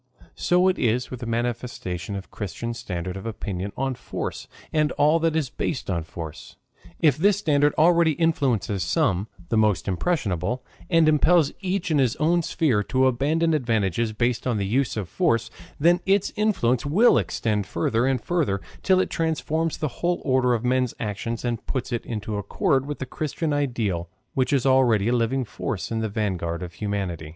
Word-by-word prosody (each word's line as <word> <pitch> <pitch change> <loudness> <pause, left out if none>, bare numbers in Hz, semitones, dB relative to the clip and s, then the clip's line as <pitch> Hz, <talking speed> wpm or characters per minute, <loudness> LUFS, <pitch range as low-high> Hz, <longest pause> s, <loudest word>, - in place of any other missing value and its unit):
So 180 +1 +2
it 185 - +1
is 120 +2 0
with 130 - -6
the 120 - -6
manifestation 115 -6 -3
of 100 - -4
the - - -29
Christian 115 +4 -5
standard 90 -6 -5
of 95 +3 -6
opinion 100 -3 -4
on 135 0 0
force - - -5 0.3
and 150 -1 +2
all 150 +3 +3
that 165 -1 +1
is 145 -6 0
based 125 -7 -3
on 85 -2 0
force. 80 -2 -8 0.5
If 150 -5 +4
this 200 +4 +3
standard 145 -5 +2
already 170 0 +5
influences 135 - 0
some, 110 - +1 0.2
the 110 - +2
most 105 -4 +2
impressionable, 100 - -1 0.2
and 165 -2 +4
impels 155 +1 +4
each 185 -2 -2
in 150 - +3
his 125 -4 +2
own 170 +3 +2
sphere 150 -9 +1
to 130 0 +2
abandon 150 +6 +2
advantages 115 - 0
based 120 +3 -1
on 120 -3 +1
the 100 - -1
use 120 +4 0
of 100 -5 -3
force, 115 - 0 0.3
then 170 +4 +4
its 195 0 +2
influence 180 - +1
will 190 +12 +4
extend 105 -3 -1
further 115 +9 0
and 135 -1 +1
further 135 - 0 0.2
till 190 -1 +3
it - - +1
transforms 160 0 -1
the 155 - -1
whole 175 0 +1
order 130 -2 +3
of 115 +1 -3
men's 125 -1 +1
actions 110 +2 -3
and 120 -2 -3
puts 130 -1 -3
it 120 - -3
into 105 -2 -3
accord 135 +6 0
with 145 - -4
the 130 - -4
Christian 150 +3 -3
ideal 110 -12 -1 0.2
which 130 -4 +1
is 140 -3 +2
already 120 -6 +4
a - - +2
living 125 +2 0
force 115 -2 -4
in 115 - -1
the 110 -1 -1
vanguard 95 -5 -2
of 90 -1 -7
humanity. 95 -7 -3
125 Hz, 180 wpm, -24 LUFS, 105-155 Hz, 0.5 s, already